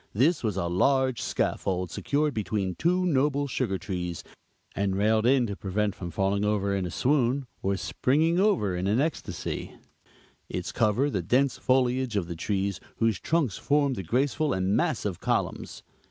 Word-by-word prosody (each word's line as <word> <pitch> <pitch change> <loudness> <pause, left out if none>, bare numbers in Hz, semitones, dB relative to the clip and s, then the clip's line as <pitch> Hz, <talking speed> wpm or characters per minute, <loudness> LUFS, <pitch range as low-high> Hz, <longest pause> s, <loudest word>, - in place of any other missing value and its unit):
This 145 - +2
was 105 -4 -1
a 85 - 0
large 130 +8 +2
scaffold, 90 -2 -1
secured 145 0 0
between 100 -2 -2
two 180 - +1
noble 145 -2 +1
sugar 95 -6 -1
trees, 90 -2 -4 0.5
and 100 -1 0
railed 110 +3 +2
in 130 -1 +4
to 100 -3 -4
prevent 100 +1 -1
from 90 - -7
falling 95 +4 0
over 100 -1 +1
in 95 -2 -1
a - - -5
swoon, 130 - +1 0.2
or 95 0 0
springing 160 - +1
over 185 - +2
in 90 +2 -2
an 105 +5 +2
ecstasy; 140 - -3 0.7
its - - -4
cover 120 +7 +1
the 100 - -1
dense 125 +9 +1
foliage 130 -2 +1
of 100 -4 0
the 85 - -5
trees, 100 +1 -2 0.2
whose 115 -5 +1
trunks 155 - 0
formed 145 -2 +2
the 95 - -4
graceful 135 - 0
and 95 +2 +1
massive 120 - -1
columns. - - -2
110 Hz, 165 wpm, -27 LUFS, 95-140 Hz, 0.7 s, in